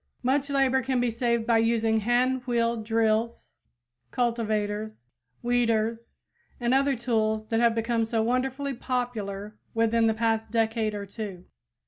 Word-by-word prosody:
Much 275 +3 +1
labor 270 -1 +2
can 260 0 0
be 245 -1 +1
saved 235 0 0
by 230 -1 +3
using 225 -1 +2
hand 250 +4 +1
wheel 235 -1 +1
drills, 225 +1 0 0.6
cultivators, 215 - -2 0.4
weeders 230 -1 0 0.5
and 240 0 +1
the - - +6
other 275 0 +2
tools 220 -2 -1
that 225 - +1
have 235 -1 +3
become 230 0 0
so 225 0 0
wonderfully 265 +4 -1
popular 215 -5 -4 0.2
within 230 0 +3
the 220 - +1
past 225 0 0
decade 225 -1 0
or 200 -1 -5
two. 200 -3 -7
230 Hz, 140 wpm, -27 LUFS, 220-245 Hz, 0.6 s, the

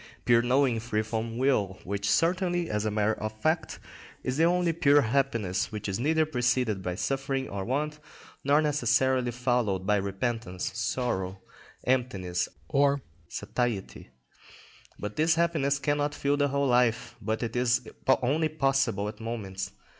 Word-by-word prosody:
_, - - -17 0.2
pure 120 -1 +5
knowing 125 -1 +2
free 110 -1 -1
from 115 +1 -3
will, 115 -8 +1
which 100 +1 -2
certainly, 175 0 +2
as 105 0 -1
a - - +2
matter 105 +1 +1
of 110 0 -2
fact, 160 +5 0 0.5
is 130 - -1
the 160 - +4
only 175 0 +3
pure 145 -3 +5
happiness, 115 -7 0
which 105 -1 -5
is 95 +1 -2
neither 155 +4 +2
preceded 125 -7 0
by 90 -1 -3
suffering 135 +4 -1
or 100 -1 -4
want, 150 +6 -2 0.4
nor 145 +3 +4
necessarily 130 -3 +2
followed 120 -6 0
by 105 +1 +3
repentance, 100 -1 -2
sorrow, 100 -4 -2 0.4
emptiness, 95 -9 0 0.2
or 140 -2 +2 0.2
satiety; 115 0 -3 0.9
but 105 0 -6
this 160 +1 +3
happiness 155 -5 +1
cannot 145 +1 0
fill 140 +1 +1
the 145 0 +2
whole 140 0 0
life, 120 -2 +2
but 110 +2 -2
is 125 0 +1 0.4
only 155 +5 +2
possible 135 -8 +1
at 105 0 -7
moments. 100 -4 -4
125 Hz, 145 wpm, -28 LUFS, 105-140 Hz, 0.9 s, pure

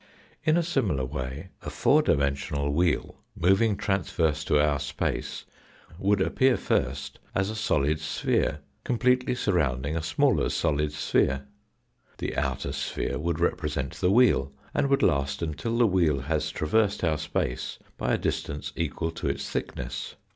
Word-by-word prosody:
In 155 +1 +3
a 175 - +2
similar 110 - 0
way 65 +5 -5
a - - -5
four - - +4
dimensional 70 +1 0
wheel 85 +1 +1 0.2
moving 95 +4 +3
transverse 80 -6 0
to 75 - +3
our 75 -1 +2
space 70 0 -3 0.5
would 100 +1 +2
appear 130 +6 +3
first 65 +2 -1 0.2
as 95 +2 +1
a - - -5
solid 75 -8 +1
sphere, 75 -1 0 0.2
completely 125 +1 +2
surrounding 75 - 0
a 80 - -1
smaller 80 +1 +2
solid 75 -2 0
sphere. 70 -2 +1 0.7
The - - -3
outer - - -1
sphere - - -2
would 85 +1 -1
represent 75 -5 -1
the 90 - +1
wheel, 100 - +4 0.2
and 140 - +1
would 140 - +3
last 70 -1 +1
until 100 +9 -2
the 120 - +5
wheel 85 -9 +2
has 75 +1 -1
traversed 100 +7 +1
our 80 -3 +1
space 75 -1 -2 0.2
by - - +1
a - - -1
distance 70 -1 -3
equal 80 0 -2
to 80 - -4
its 70 0 -3
thickness. - - -4
80 Hz, 145 wpm, -27 LUFS, 70-100 Hz, 0.7 s, the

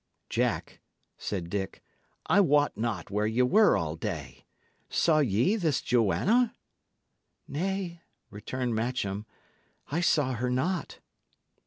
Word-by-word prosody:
"Jack," - - -1 0.3
said 90 -5 -4
Dick, 95 -3 -4 0.4
"I 200 - +4
wot 145 -6 +3
not 105 -4 -3
where 105 +1 +1
ye 115 +3 +2
were 210 +12 +5
all 80 -2 -2
day. 80 - -6 0.4
Saw 155 -2 +3
ye 125 - +2
this 160 -9 +1
Joanna?" 215 - +2 0.9
"Nay," 175 +2 -3 0.3
returned 120 +4 -3
Matcham, 110 -3 -2 0.6
"I 165 +4 0
saw 145 -6 +2
her 125 +1 -1
not." 165 +9 -1
125 Hz, 115 wpm, -28 LUFS, 105-170 Hz, 0.9 s, were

